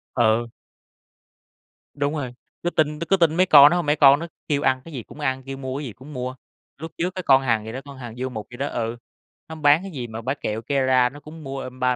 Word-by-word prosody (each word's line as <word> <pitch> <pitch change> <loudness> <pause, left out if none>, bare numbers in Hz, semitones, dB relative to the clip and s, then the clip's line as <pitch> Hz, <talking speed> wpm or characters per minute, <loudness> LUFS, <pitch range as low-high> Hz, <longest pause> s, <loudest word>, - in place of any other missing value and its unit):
Ừ. 115 -1 +3 1.5
Đúng 145 +1 -1
rồi, 130 -5 -4 0.3
cứ 175 - +1
tin 150 -2 0
cứ 170 - -3
cứ 195 - +4
tin 165 -2 +3
mấy 185 - +5
con 145 -4 +9
đó 175 - +2
hông, 175 - -1
mấy 150 +1 +2
con 140 -1 +6
nó 170 - -5 0.2
kêu 145 -2 0
ăn 130 -2 +2
cái 165 - -11
gì 120 -5 -5
cũng - - -14
ăn, 130 -2 -1
kêu 135 0 -7
mua 130 0 -4
cái 145 - -5
gì 115 - -7
cũng 140 +4 -13
mua. 125 0 -4 0.4
Lúc 160 +2 -8
trước 180 +2 -2
cái 185 - -4
con 135 -2 +5
Hằng 115 -4 0
gì 110 - -6
đó, 130 - -5
con 140 -1 -11
Hằng 120 -3 -8
Du 130 +1 -3
Mục 110 -4 -7
gì 120 - -9
đó 140 +2 -2
ừ, 115 -2 -3 0.5
nó 160 - -6
bán 150 +2 +4
cái 195 -1 -8
gì 125 -5 -5
mà 110 +1 -7
bán 135 +4 -2
kẹo 110 +1 -2
Kera 130 0 +2
nó 145 +2 -12
cũng 155 +1 -12
mua, 135 0 -5
ơ, 130 - -6
ba 125 0 0
135 Hz, 270 wpm, -23 LUFS, 125-150 Hz, 1.5 s, con